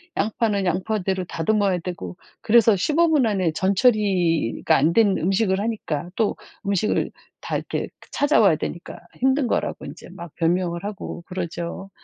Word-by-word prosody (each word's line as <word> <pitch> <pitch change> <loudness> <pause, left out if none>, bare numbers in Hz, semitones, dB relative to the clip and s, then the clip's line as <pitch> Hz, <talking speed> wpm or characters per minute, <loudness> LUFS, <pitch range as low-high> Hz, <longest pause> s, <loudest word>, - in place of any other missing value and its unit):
양파는 210 -1 0
양파대로 190 +1 -1
다듬어야 190 +2 0
되고 165 - -6 0.3
그래서 225 -1 +5
15분 305 - +3
안에 190 -6 +1
전 190 +4 0
처리가 185 - +2
안 155 +5 +2
된 205 -2 +4
음식을 190 +2 +1
하니까 200 -7 -3
또 220 -2 +1 0.3
음식을 200 +1 0 0.3
다 - - -2
이렇게 - - -4 0.2
찾아와야 225 - +4
되니까 170 +2 -6 0.2
힘든 265 +1 +2
거라고 - - -2
인제 - - -10
막 170 -3 -10
변명을 170 +1 0
하고 200 -4 -6
그러죠. 175 0 -5
190 Hz, 310 characters per minute, -23 LUFS, 175-220 Hz, 0.3 s, 그래서